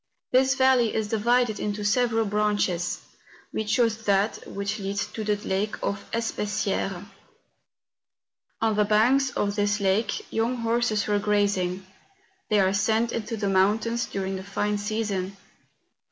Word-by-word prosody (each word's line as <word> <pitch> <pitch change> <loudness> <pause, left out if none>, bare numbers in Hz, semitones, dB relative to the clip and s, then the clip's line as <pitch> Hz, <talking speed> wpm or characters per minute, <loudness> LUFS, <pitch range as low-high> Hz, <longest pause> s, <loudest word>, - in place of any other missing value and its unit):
This 265 +1 +4
valley 260 -4 +3
is 220 -1 -1
divided 235 +1 +2
into 210 0 -3
several 225 +1 +2
branches; 205 -4 0 0.5
we 220 - -1
chose 225 +1 +2
that 200 +1 +1
which 200 +2 -3
leads 195 0 -2
to 220 - -6
the 210 0 +1
lake 200 +3 -1
of 200 0 -2
the - - -1
Espessieres. 205 -4 -2 1.6
On 220 -1 +2
the 210 - +3
banks 240 +6 +3
of 205 -4 -1
this 205 0 +1
lake 200 +2 0
young 230 +3 +1
horses 230 -2 0
were 205 -1 +1
grazing: 200 -3 0 0.6
they 210 - +3
are 190 0 +3
sent 220 +3 +1
into 230 0 -3
the 205 -1 -1
mountains 215 +5 +2
during 195 -1 -3
the 190 - -7
fine 205 +1 -1
season. 205 -3 -2
210 Hz, 140 wpm, -26 LUFS, 200-225 Hz, 1.6 s, This